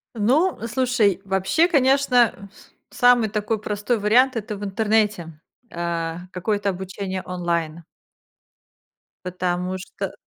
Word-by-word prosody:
Ну, 275 - +2
слушай, 235 -6 +1
вообще, 195 - +2
конечно, 260 - +2 0.4
с - - -18
самый 245 -3 +4
такой 210 +1 -2
простой 210 +3 -2
вариант- 245 +6 +3
это 215 -2 -4
в 205 - -8
интернете, 205 -5 0 0.3
э, 170 -1 -3 0.2
какое-то 200 +2 -1
обучение 190 0 -5
онлайн. 170 -2 -3 1.4
Потому 180 0 -2
что 185 - -6
205 Hz, 105 wpm, -22 LUFS, 180-235 Hz, 1.4 s, самый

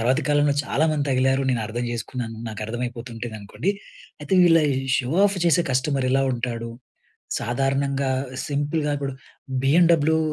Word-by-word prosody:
తర్వాత 125 +3 +2
కాలంలో 145 -1 +3
చాలా 155 - +1
మంది 150 -2 0
తగిలారు, 135 +1 +2
నేను 120 -3 0
అర్థం 120 +3 -3
చేసుకున్నాను, 120 -1 -5
నాకు 110 -2 -6
అర్థమైపోతుంటదనుకోండి. 120 - -4 0.5
అయితే, 150 +5 -6
వీళ్ళ 165 -1 +6 0.2
ఈ - - 0 0.2
షో 125 -1 -2 0.2
ఆఫ్ 200 -1 -2
చేసే 170 +1 +3
కస్టమర్ 130 0 0
ఎలా 135 0 +3
ఉంటాడు, 115 -1 -3 0.7
సాధారణంగా 135 +2 0 0.4
సింపుల్‌గా 145 +1 -1
కూడా 135 -1 -2 0.5
బీఎండబ్ల్యూ 160 +1 +4
135 Hz, 135 wpm, -23 LUFS, 120-145 Hz, 0.7 s, వీళ్ళ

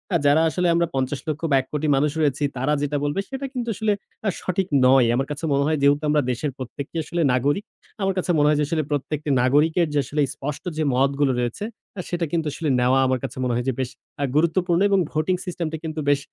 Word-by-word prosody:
আ - - +6
যারা 150 +3 +5
আসলে 180 +2 0
আমরা 170 0 +2
৫০ 130 +1 -1
লক্ষ 155 +1 -2
বা - - +5
১ 130 - -5
কোটি 150 +1 -1
মানুষ 145 +2 +2
রয়েছি 145 -1 +1
তারা 140 +4 +1
যেটা 145 0 -1
বলবে 145 +6 -1
সেটা 270 0 -4
কিন্তু 240 -2 -3
আসলে 215 0 +1 0.3
আ - - +4
সঠিক 185 +1 -1 0.2
নয়। 130 -2 +6
আমার 135 +2 0
কাছে 145 +3 -4
মনে 140 0 +2
হয় 155 -1 +1
যেহেতু 145 +2 +3
আমরা 150 -1 +3
দেশের 140 +4 -2
প্রত্যেকে 135 +4 -7
আসলে 170 +3 -2
নাগরিক, 145 +10 +1 0.4
আমার 195 0 +1
কাছে 180 -1 0
মনে 145 0 +4
হয় 150 - +3
যে 150 - +2
আসলে 155 -1 0
প্রত্যেকটি 150 +1 -2
নাগরিকের 155 +6 +3
যে 145 - +2
আসলে 150 0 -1
স্পষ্ট 145 +1 -5
যে 155 - +1
মতগুলো 140 +1 +2
রয়েছে 120 - -2 0.4
সেটা 175 -1 -1
কিন্তু 165 -2 0
আসলে 160 -3 -2
নেওয়া 125 +2 +3
আমার 130 0 +1
কাছে 130 - -5
মনে 125 -1 0
হয় 120 +1 -1
যে 130 - 0
বেশ 130 -2 -1 0.3
অ্যা 145 - 0
গুরুত্বপূর্ণ 170 +2 +2
এবং 195 -1 +3
ভোটিং 155 +4 +1
সিস্টেমটা 165 -3 -3
কিন্তু 155 -1 -4
আ - - -8
বেশ 145 - +4
150 Hz, 230 wpm, -23 LUFS, 135-170 Hz, 0.4 s, আ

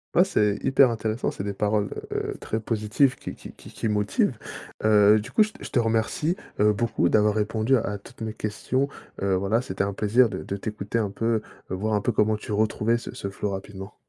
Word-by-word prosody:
Ah, 180 - +7
c'est 105 - +1
hyper 135 -2 +5
intéressant, 110 +1 -2
c'est 95 - -6
des 100 - -3
paroles, 105 0 0 0.2
heu, - - -2
très 110 - -3
positives, 115 +5 +1
qui - - -7
qui - - -11
qui - - -14
qui 115 - -3
motivent, 105 -1 +1 0.5
heu, 105 0 +6
du 115 +5 -8
coup, 215 - +3
je 215 - +3
te - - -13
je - - -7
te 125 - +2
remercie, 115 +10 +1 0.2
heu, 105 0 +5
beaucoup 105 -4 +1
d'avoir 105 -1 +4
répondu 110 +4 +1
à 105 -3 -2
toutes 100 - -16
mes 110 -1 -3
questions, 130 +6 -1 0.4
heu, 95 -1 +2
voilà, 100 +6 +1
c'était 95 -4 -2
un 100 0 -2
plaisir 110 +4 +3
de 95 - -5
de 100 - -4
t'écouter 105 +2 -3
un 105 -3 0
peu, 115 +1 0 0.3
voir 105 +4 -1
un 105 - +1
peu - - +1
comment 110 0 +2
tu 105 - -8
retrouvais 110 +2 +1
ce - - -8
ce 100 - -5
flow 100 +1 -3
rapidement. 95 0 -7
110 Hz, 215 wpm, -25 LUFS, 100-115 Hz, 0.5 s, Ah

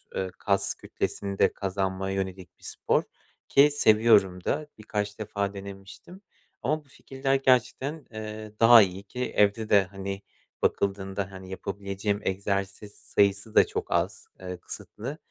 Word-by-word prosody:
eee, 95 -1 -2
kas 100 -1 +1
kütlesini 100 -1 -4
de - - +4
kazanmaya 95 0 -2
yönelik 95 -2 -5
bir - - -23
spor - - 0 0.4
ki 145 +2 +6
seviyorum 105 -8 +4
da, 150 +1 -1
birkaç 105 -1 -3
defa 100 -1 -2
denemiştim. 100 - -10 0.4
Ama 150 +3 -1
bu - - -26
fikirler 135 0 -2
gerçekten, 135 +3 +1
eee, 110 0 -7
daha 115 0 +9
iyi 95 0 -1
ki 125 +5 -4
evde 105 +2 +2
de, 100 -1 +6
hani, 95 +1 -6 0.4
bakıldığında, 95 -1 -1
hani, 95 0 -10
yapabileceğim 100 +1 -3
egzersiz 100 +1 -2
sayısı 100 +2 +1
da - - +7
çok - - -4
az, - - 0
eee, 90 -1 -6
kısıtlı. 120 - -6
100 Hz, 135 wpm, -27 LUFS, 95-110 Hz, 0.4 s, daha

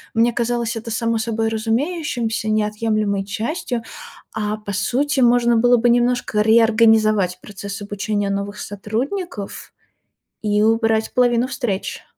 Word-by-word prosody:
Мне 235 +1 +3
казалось 235 0 -1
это 225 +1 -6
само 230 +1 0
собой 225 0 -1
разумеющимся, 230 -1 -1
неотъемлемой 215 -1 0
частью, 230 - -3 0.5
а, 215 -1 -2
по 210 -1 -7
сути, 275 +7 0
можно 240 -1 +4
было 245 +2 +4
бы 240 +1 +2
немножко 240 -2 +2
реорганизовать 220 -4 +4
процесс 200 0 -7
обучения 205 0 -2
новых 200 +1 -3
сотрудников 220 - -5 0.7
и 210 0 +2
убрать 225 0 +2
половину 245 -1 +3
встреч. 245 -7 -3
225 Hz, 120 wpm, -20 LUFS, 210-240 Hz, 0.7 s, можно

